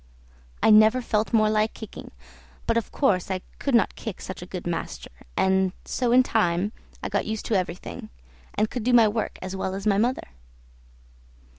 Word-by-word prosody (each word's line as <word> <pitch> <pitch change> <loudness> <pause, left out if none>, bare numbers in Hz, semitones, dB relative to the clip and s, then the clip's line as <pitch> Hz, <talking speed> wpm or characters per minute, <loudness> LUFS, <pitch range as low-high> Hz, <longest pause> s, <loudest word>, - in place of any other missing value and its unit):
I - - +6
never 215 +3 +7
felt 220 -3 -1
more 215 -2 +4
like 215 0 +1
kicking, 220 - -9 0.6
but 230 - +1
of 230 - -1
course 195 -11 +1
I 185 -1 -2 0.2
could 275 -3 +1
not 235 - +3
kick 220 -5 -7
such 185 -2 -7
a 180 - -8
good 180 -1 -6
master, 175 -1 -4 0.3
and 190 -1 +2
so 245 -2 -1
in 255 +1 +6
time 200 -4 +1 0.3
I - - -1
got - - -1
used 220 0 -3
to 220 - 0
everything, 180 -2 -4 0.5
and 215 - +2
could 245 - -3
do 250 +2 +2
my 230 -2 +7
work 220 +1 -2
as 185 +1 -5
well 190 0 -3
as 195 +1 -6
my 200 -2 +3
mother. 245 +4 0
215 Hz, 185 wpm, -25 LUFS, 190-230 Hz, 0.6 s, never